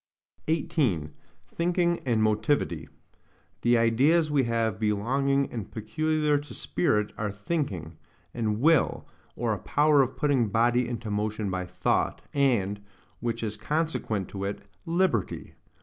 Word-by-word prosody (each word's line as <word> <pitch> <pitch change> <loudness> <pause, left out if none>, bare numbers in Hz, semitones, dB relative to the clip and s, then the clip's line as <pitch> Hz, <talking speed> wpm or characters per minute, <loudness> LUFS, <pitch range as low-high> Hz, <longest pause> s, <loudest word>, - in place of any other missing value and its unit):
18. 145 - 0 0.4
Thinking 175 - 0
and 115 -3 +2
Motivity 110 +6 0 0.7
The 120 0 +4
ideas 140 +8 +3
we 140 -3 +3
have 115 -4 0
belonging 135 +6 +1
and 110 -5 -5
PECULIAR 150 +7 0
TO 145 0 -10
SPIRIT, 105 -11 0
are 105 -2 -1
THINKING, 100 - -3 0.4
and 110 -3 -1
WILL, 155 +1 +3 0.3
or 115 -2 0
A 100 - -4
POWER 150 -1 +3
OF 130 -1 -1
PUTTING 140 -7 +2
BODY 120 +4 +2
INTO 115 -3 -4
MOTION 105 -1 -1
BY 90 -1 -3
THOUGHT, - - 0
AND, 110 -8 +1 0.4
WHICH 115 -1 -2
IS 110 -1 -2
CONSEQUENT 150 - -1
TO 100 -1 -6
IT, 100 0 -5 0.2
LIBERTY. 170 - 0
120 Hz, 130 wpm, -27 LUFS, 105-150 Hz, 0.7 s, The